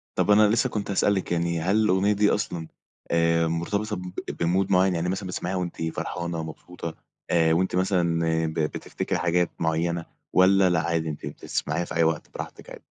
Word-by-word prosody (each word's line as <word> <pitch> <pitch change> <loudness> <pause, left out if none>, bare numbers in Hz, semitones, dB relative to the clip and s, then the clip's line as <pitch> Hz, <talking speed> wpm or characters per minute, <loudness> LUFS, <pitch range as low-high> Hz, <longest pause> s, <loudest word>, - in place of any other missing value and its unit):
طب 105 - +2
أنا 105 +1 +7
لسه 115 +5 +2
كنت 105 -3 -3
هأسألِك 95 -2 +1
يعني، 85 0 0
هل 95 +5 +1
الأغنية 105 -1 +3
دي 105 0 +3
أصلًا، 85 -6 -2 0.4
آآ 85 0 +3
مرتبطة 100 +6 -1
ب 90 -1 -6 0.3
بmood 95 +4 +1
معين؟ 95 0 +4
يعني 85 +1 -1
مثلًا 95 +1 -3
بتسمعيها 90 0 -3
وأنتِ 90 -2 -4
فرحانة، 85 -2 -3
مبسوطة، 80 +1 -7 0.3
آآ 80 -1 +3
وأنتِ 90 +2 +1
مثلًا 90 -3 +1 0.3
ب 80 - -3
بتفتكري 75 -1 -2
حاجات 90 0 +2
معينة 85 +1 0 0.3
والَّا 95 0 +5
لأ، 85 -2 +2
عادي 80 -1 -1
أنتِ 75 -2 -6
بتسمعيها 75 +3 -3
في - - -7
أي 85 - +4
وقت 80 -1 0
براحتك - - -8
عادي؟ - - -11
85 Hz, 175 wpm, -25 LUFS, 85-95 Hz, 0.4 s, أنا